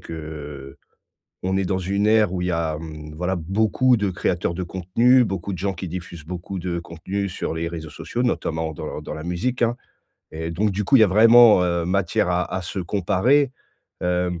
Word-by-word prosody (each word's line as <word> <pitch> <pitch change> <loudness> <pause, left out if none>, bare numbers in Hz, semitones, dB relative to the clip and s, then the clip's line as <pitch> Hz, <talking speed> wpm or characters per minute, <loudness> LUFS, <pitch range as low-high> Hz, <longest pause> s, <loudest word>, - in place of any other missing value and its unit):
qu'on 75 -4 -9 0.6
est 95 - +1
dans 95 0 -1
une 100 +3 0
ère 110 -3 +4
où 90 -1 -2
il 90 - -1
y - - +1
a, 80 -2 -1
mmh, 75 -1 -9
voilà, 90 +3 -1
beaucoup 110 +8 +2
de 100 -2 0
créateurs 90 -1 -1
de 90 - -4
contenus, 110 +9 +3
beaucoup 95 -1 -4
de 90 - -5
gens 95 0 -1
qui 95 +1 -6
diffusent 85 -2 -7
beaucoup 90 +3 -6
de 85 -1 -3
contenus 90 +4 -4
sur - - -3
les 85 +1 -2
réseaux 80 -2 -7
sociaux, 120 - -4
notamment 80 -9 -1
dans 75 - -6
dans - - -6
la 80 +1 -7
musique, 115 +9 -2
hein 120 +1 +2 0.6
et 80 +1 -4
donc 100 +6 0
du 100 +2 -1
coup, 135 - +5
il - - +5
y - - +8
a - - +4
vraiment, 115 0 +7
heu, 85 -1 0
matière 100 +2 +1
à 90 0 +1
à 95 - -1
se 90 - -5
comparer, 115 +10 +2 0.5
hem, 90 -1 0
90 Hz, 205 wpm, -23 LUFS, 85-100 Hz, 0.6 s, y